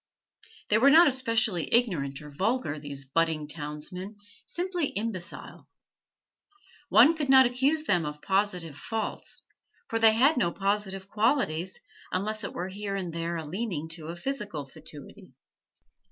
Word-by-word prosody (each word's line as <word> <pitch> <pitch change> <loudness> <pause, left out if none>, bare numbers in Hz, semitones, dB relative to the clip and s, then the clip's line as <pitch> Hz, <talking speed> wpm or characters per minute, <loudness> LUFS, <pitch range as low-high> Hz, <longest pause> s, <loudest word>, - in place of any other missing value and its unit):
They 210 - +4
were 275 +4 +6
not 330 +4 +8
especially 230 - +1
ignorant 160 - +1
or 150 - -10
vulgar, 190 - -1
these 140 -2 -6
budding 155 +1 0
townsmen, 155 +6 -5 0.3
simply 355 -3 -2
imbecile. 200 -4 -6 1.2
One 280 +8 +7
could 295 -3 -3
not 265 -1 +8
accuse 270 +6 +1
them 180 - +2
of 150 0 -5
positive 185 -4 -1
faults, 225 +6 -4 0.5
for 225 - 0
they 225 -1 +6
had 270 +7 +4
no 175 -9 +2
positive 195 0 -2
qualities, 200 - 0 0.3
unless 210 +3 -2
it - - -5
were 180 +2 -4
here 200 +1 -4
and 180 -4 -4
there 170 +1 -2
a 160 -1 -4
leaning 175 -2 -3
to 165 0 -6
physical 205 - -4
fatuity. 155 +4 -12
195 Hz, 140 wpm, -28 LUFS, 160-230 Hz, 1.2 s, not